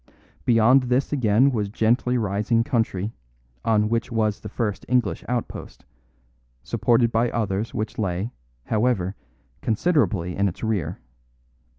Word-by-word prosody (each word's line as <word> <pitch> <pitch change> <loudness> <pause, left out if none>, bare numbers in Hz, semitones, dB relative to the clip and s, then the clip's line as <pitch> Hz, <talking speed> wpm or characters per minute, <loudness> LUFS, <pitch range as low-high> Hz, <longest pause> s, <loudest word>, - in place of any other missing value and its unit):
Beyond 120 +3 +5
this 130 +4 +1
again 125 0 +3
was 105 -5 -1
gently 120 +4 +1
rising 110 +2 +1
country, 110 -5 -1 0.5
on 105 -1 +2
which 115 +2 -1
was 110 -2 0
the - - -8
first 105 -5 -2
English 125 -5 +1
outpost, 125 -2 -4 0.8
supported 115 -1 +2
by 115 +1 +2
others 105 -1 -1
which 110 +1 -3
lay, 95 +2 -1 0.3
however, 105 -4 0 0.5
considerably 110 - +1
in 100 0 +2
its 95 - -6
rear. 95 -7 -1
110 Hz, 120 wpm, -24 LUFS, 100-120 Hz, 0.8 s, Beyond